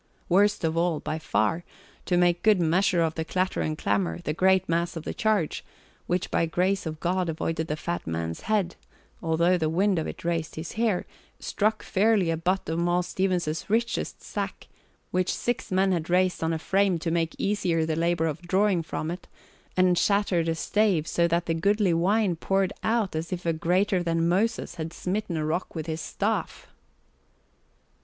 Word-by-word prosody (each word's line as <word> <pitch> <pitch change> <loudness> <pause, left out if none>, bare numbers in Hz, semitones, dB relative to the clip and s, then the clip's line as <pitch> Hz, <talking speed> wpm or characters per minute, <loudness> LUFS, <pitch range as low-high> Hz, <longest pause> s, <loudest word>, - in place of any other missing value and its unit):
Worst 205 +3 +3
of 160 0 0
all, 170 -2 +1
by 155 - -4
far, 160 +4 0 0.4
to 175 - +2
make 175 0 +3
good 215 -3 +4
measure 175 +2 +2
of 160 -1 0
the 160 - -3
clatter 185 +3 -1
and 155 0 -2
clamour, 95 - 0
the 150 - -1
great 190 +2 +3
mass 170 +1 0
of 165 - -5
the - - -4
charge, 215 -8 0 0.4
which 180 +1 -1
by 165 - +2
grace 185 +2 0
of 155 -1 -5
God 180 0 0
avoided 160 0 -2
the 150 - -1
fat 170 - -4
man's 80 0 -3
head 200 -5 +1 0.5
although 170 +2 +2
the 160 -1 +1
wind 185 +2 +2
of 160 - -3
it - - -8
raised 165 -2 -1
his 160 +1 -6
hair, 220 -5 0 0.3
struck 215 +1 0
fairly 200 -3 +2
a - - +1
butt 185 +4 -1
of 165 +1 -1
Moll 175 +1 +2
Stevens's 180 -3 -1
richest 230 +2 -1
sack, - - -5 0.4
which 185 0 +1
six 240 -2 -2
men 190 +1 +3
had 170 -2 -1
raised 180 -1 +2
on 160 - +1
a 165 - 0
frame 190 +2 +2
to 165 0 -3
make 165 -1 0
easier 175 -5 0
the 160 -1 -1
labour 170 0 +1
of 155 -1 -3
drawing 185 +1 +2
from 160 0 -4
it, 180 - -7 0.5
and 180 -1 +4
shattered 200 -5 +2
a 165 - 0
stave 195 -2 +1
so 170 0 +1
that 170 +1 0
the 165 - 0
goodly 200 +2 +2
wine 190 +3 +2
poured 195 +3 0
out 220 -6 0
as 160 +3 -3
if 180 -1 -4
a 165 - +2
greater 180 +4 +1
than 165 -1 +1
Moses 195 +2 0
had 160 +1 -5
smitten 185 -1 -2
a 155 - -1
rock 170 +4 -2
with 160 - -3
his 160 -1 -3
staff. - - -2
175 Hz, 190 wpm, -26 LUFS, 165-190 Hz, 0.5 s, good